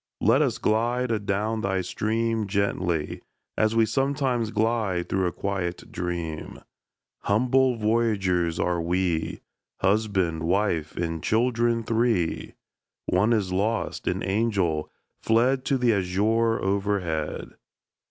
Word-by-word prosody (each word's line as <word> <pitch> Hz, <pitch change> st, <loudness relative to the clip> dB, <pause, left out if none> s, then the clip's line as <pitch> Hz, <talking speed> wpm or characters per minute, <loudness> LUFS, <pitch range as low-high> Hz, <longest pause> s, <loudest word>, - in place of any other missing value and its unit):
Let -, -, +4 dB
us -, -, +1 dB
glide 120 Hz, +3 st, +1 dB
adown 105 Hz, +1 st, -1 dB
thy 95 Hz, -1 st, 0 dB
stream 110 Hz, +3 st, -1 dB
Gently 95 Hz, -5 st, -1 dB, 0.3 s
as 110 Hz, +1 st, +1 dB
we 115 Hz, -1 st, +5 dB
sometimes 135 Hz, -1 st, 0 dB
glide 110 Hz, -6 st, 0 dB
Through 95 Hz, -1 st, +1 dB
a -, -, -1 dB
quiet 95 Hz, -3 st, -4 dB
dream! 85 Hz, -3 st, -4 dB, 0.6 s
Humble 125 Hz, +4 st, +2 dB
voyagers 105 Hz, -7 st, +1 dB
are 90 Hz, -1 st, 0 dB
we, 85 Hz, -1 st, -1 dB, 0.4 s
Husband, 95 Hz, -5 st, +1 dB
wife, 85 Hz, -2 st, 0 dB
and 80 Hz, -2 st, -2 dB
children 115 Hz, +2 st, +1 dB
three 110 Hz, -7 st, 0 dB, 0.5 s
(One 100 Hz, +5 st, +2 dB
is 100 Hz, -5 st, +1 dB
lost 110 Hz, +4 st, -1 dB
an -, -, -1 dB
angel, 95 Hz, -6 st, 0 dB, 0.3 s
fled 125 Hz, +4 st, +2 dB
To 135 Hz, -, +2 dB
the 120 Hz, -2 st, +3 dB
azure 105 Hz, +4 st, +1 dB
overhead!) 95 Hz, -6 st, -1 dB
100 Hz, 115 wpm, -25 LUFS, 90-115 Hz, 0.6 s, we